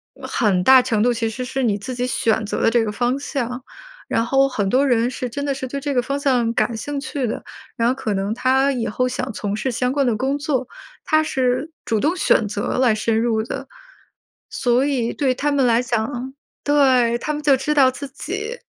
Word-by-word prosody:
呃 - - -9
很 200 -7 +1
大 260 +6 +8
程 235 -4 0
度 245 +3 +3
其 230 -1 -1
实 240 +3 -5
是 265 +1 -3
你 220 -4 +2
自 225 +6 -6
己 245 0 -1
选 225 -3 0
择 205 - -3
的 - - +4
这 230 -1 +2
个 210 - -2
方 245 +5 0
向， 250 -3 -3 0.5
然 230 - +1
后 270 +3 +3
很 210 -7 -1
多 270 +6 +3
人 240 -2 +2
是 250 0 -4
真 285 +5 -4
的 285 -1 0
是 265 -1 -5
对 275 +2 -5
这 285 0 -2
个 250 - +3
方 275 +3 -2
向 250 -5 +1
感 220 0 0
兴 285 +5 -4
趣 265 0 -3
的， 220 - -4 0.3
然 230 +1 +2
后 255 - 0
可 220 -5 -2
能 195 +1 -2
他 265 +2 +2
以 245 -4 -2
后 255 +4 0
想 255 -1 -4
从 205 -1 -3
事 240 +5 -2
相 250 +1 0
关 280 0 +1
的 240 -3 +1
工 265 +5 -1
作， 280 -3 -1 0.4
他 310 -3 +2
是 260 +1 -1
主 220 - 0
动 310 - +1
选 230 - +2
择 205 0 -3
来 250 -3 +4
深 220 +1 0
入 225 -1 +1
的。 230 - -6 0.8
所 245 +1 +1
以 255 -5 0
对 270 -3 +1
他 290 +3 -1
们 280 -2 +2
来 235 -1 +3
讲 250 +2 -3 0.3
对， 260 -5 +3
他 300 +5 -3
们 300 - -4
就 280 -2 +4
知 295 +3 -1
道 275 -3 +5
自 280 +2 -7
己， 415 - -5
255 Hz, 245 characters per minute, -21 LUFS, 230-275 Hz, 0.8 s, 大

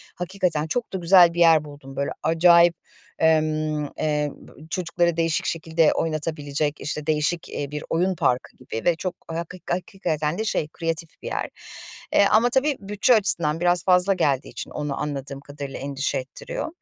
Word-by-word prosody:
hakikaten 180 -4 -1
çok 240 +4 -3
da - - -1
güzel 175 -1 +6
bir 175 - -4
yer 165 -3 +6
buldum. 145 -2 -11
Böyle 140 - -2
acayip, 170 +1 +5 0.4
emm, 155 -1 +2
eee, 150 -1 0
b - - -17 0.2
çocukları 170 -2 0
değişik 165 -1 +1
şekilde 160 -1 +1
oynatabilecek, 150 -2 -2
işte, 150 0 -4
değişik, 155 +2 0
iii, 145 0 -5
bir 150 - -5
oyun 180 +3 +1
parkı 125 -5 -1
gibi 120 -3 -7
ve 175 -2 +4
çok 180 0 -4
haki 170 +2 -6
hakikaten 175 -4 -2
de 220 - -2
şey, 150 - -1
kreatif 165 +1 -4
bir - - -7
yer. - - -3 0.6
Eee, 200 - +6
ama, 225 +3 +5
tabii, 275 +3 +2
bütçe 210 +4 +2
açısından 170 -7 +1
biraz 175 -1 +2
fazla 185 +1 +4
geldiği 145 -7 0
için - - -8
onu 145 -2 -4
anladığım 140 -2 -4
kadarıyla 140 -1 -8
endişe 140 +1 -2
ettiriyor. - - -5
165 Hz, 165 wpm, -24 LUFS, 150-180 Hz, 0.6 s, güzel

